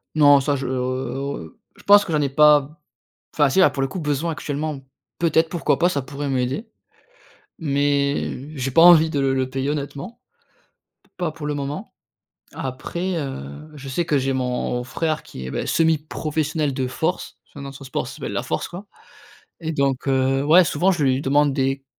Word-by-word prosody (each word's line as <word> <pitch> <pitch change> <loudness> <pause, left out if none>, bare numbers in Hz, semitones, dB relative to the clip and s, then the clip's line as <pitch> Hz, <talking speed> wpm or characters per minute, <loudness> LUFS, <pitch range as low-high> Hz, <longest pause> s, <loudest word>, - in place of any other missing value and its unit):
Non 145 -2 +7
ça 140 +1 0
je 135 -1 -4
oh, - - -2
heu 130 0 -2
oh, 140 +1 -3
heu, 80 -1 -12 0.2
je - - -18
pense 205 0 +7
que 170 - -6
j'en 150 -2 +2
ai 140 - 0
pas 150 +1 +6
b 135 - -12 0.7
enfin, 145 -2 +4
si, 135 - 0
là, 190 - +6
pour 135 - -3
le 135 - 0
coup 190 - -6
besoin 150 +2 -1
actuellement. 150 -1 -4 0.4
Peut-être 165 -1 +2
pourquoi 170 -1 0
pas, 175 - +4
ça 145 -6 -1
pourrait 140 +2 -5
m'aider 135 - -2 0.9
mais 140 0 -1
j'ai 135 0 -2
pas 165 - +5
envie 165 -2 +8
de 145 - -1
le 135 -1 +1
le 130 -1 -1
payer 135 +1 -2
honnêtement. 145 - -6 0.8
P - - -32
pas 175 -3 -1
pour 150 -1 -8
le 150 - -1
moment. 145 +1 -5 0.6
Après, 170 +8 -4
heu, 135 - -7
je 140 -2 -9
sais 155 +6 -1
que 150 -3 +1
j'ai 135 0 0
mon 125 -1 -2
frère 155 +4 -2
qui 65 - -9
est, - - -5
bah, - - -3
semi 160 -1 +3
professionnel 150 -1 -2
de 130 -1 -1
force. 160 +7 -3
Son 145 - -11
nom, 140 0 -7
son 140 0 -11
sport, 130 - -3
ça - - -9
s'appelle - - -5
la - - -2
force - - -3
quoi 180 +4 -9 0.8
et 160 -1 -3
donc, 140 -3 0
heu, 135 0 +2
ouais 170 +5 +6
souvent 175 +4 +2
je 170 -4 -1
lui 130 0 +2
demande 145 +1 +2
des 135 0 -1
145 Hz, 205 wpm, -22 LUFS, 135-155 Hz, 0.9 s, envie